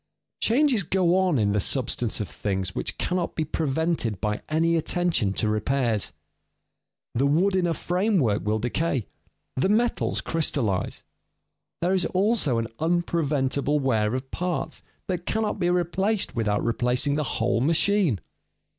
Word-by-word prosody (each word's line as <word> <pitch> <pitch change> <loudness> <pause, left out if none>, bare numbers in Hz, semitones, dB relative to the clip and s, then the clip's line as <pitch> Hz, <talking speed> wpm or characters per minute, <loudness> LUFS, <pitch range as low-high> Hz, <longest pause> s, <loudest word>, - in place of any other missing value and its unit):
_ - - -55
Changes 255 -1 +3
go 180 0 +2
on 185 -5 +2
in 105 -3 +2
the 105 - +1
substance 120 0 0
of 105 - -2
things 95 -2 -3
which - - -3
cannot 180 -1 -2
be 160 - -1
prevented 155 - -1
by 105 0 -2
any 165 +2 +2
attention 165 - +1
to 110 - 0
repairs. 110 0 0 1.0
The 135 +4 +2
wood 180 +7 +2
in 180 -2 +2
a 165 - 0
framework 175 - +1
will 105 +2 0
decay, 125 +2 -1 0.5
the 135 +9 +1
metals 235 +3 +1
crystallize. 135 - -1 0.8
There 180 +2 +2
is 185 -2 +2
also 190 - +1
an 115 - 0
unpreventable 150 -4 0
wear 115 -4 +1
of 130 +1 -5
parts 180 0 -3 0.2
that 180 -2 -4
cannot 215 -2 -1
be 175 -1 +1
replaced 185 +4 0
without 105 -3 0
replacing 125 +4 +1
the 150 +1 0
whole 115 0 +1
machine. 165 - +2
155 Hz, 145 wpm, -25 LUFS, 115-180 Hz, 1.0 s, Changes